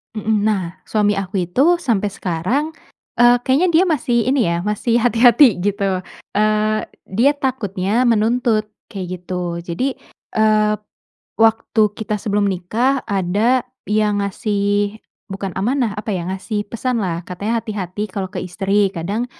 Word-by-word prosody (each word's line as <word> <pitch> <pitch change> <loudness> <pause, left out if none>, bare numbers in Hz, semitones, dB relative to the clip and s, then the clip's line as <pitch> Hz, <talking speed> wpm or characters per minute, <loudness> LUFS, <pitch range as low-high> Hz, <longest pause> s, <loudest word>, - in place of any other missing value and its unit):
Mmm. 215 -1 0
Nah, 210 -4 +1 0.2
suami 205 -1 +1
aku 195 -1 -2
itu 175 +8 -1 0.2
sampai 210 - 0
sekarang, 185 - -1 0.5
eee, 240 +1 +6
kayaknya 270 +8 +2
dia 330 +3 +6
masih 245 -4 0
ini 265 -4 +2
ya, 170 0 0
masih 210 +4 -1
hati-hati, 240 0 +5
gitu, 205 -1 0 0.5
eee 215 0 +2 0.3
dia 250 +5 +5
takutnya 230 -5 -1
menuntut, 225 -1 +2 0.2
kayak 195 -2 -4
gitu. 180 -1 -4
Jadi, 250 +11 -2 0.4
eee, 215 -1 +3 0.6
waktu 225 0 +3 0.2
kita 215 -1 -2
sebelum 205 -2 0
nikah 225 +9 0
ada 205 +7 +1 0.2
yang 210 -1 +1
ngasih 205 +1 -1 0.3
bukan 195 0 -4
amanah 240 +2 +1
apa 215 - -6
ya, 175 -2 -3
ngasih 200 +3 -3
pesanlah. 225 -8 -1
Katanya, 205 +6 -2
"Hati-hati 205 -3 -5
kalau 190 -2 -3
ke - - -5
istri. 195 +2 0
Kadang 200 +7 -2
210 Hz, 135 wpm, -19 LUFS, 195-235 Hz, 0.6 s, eee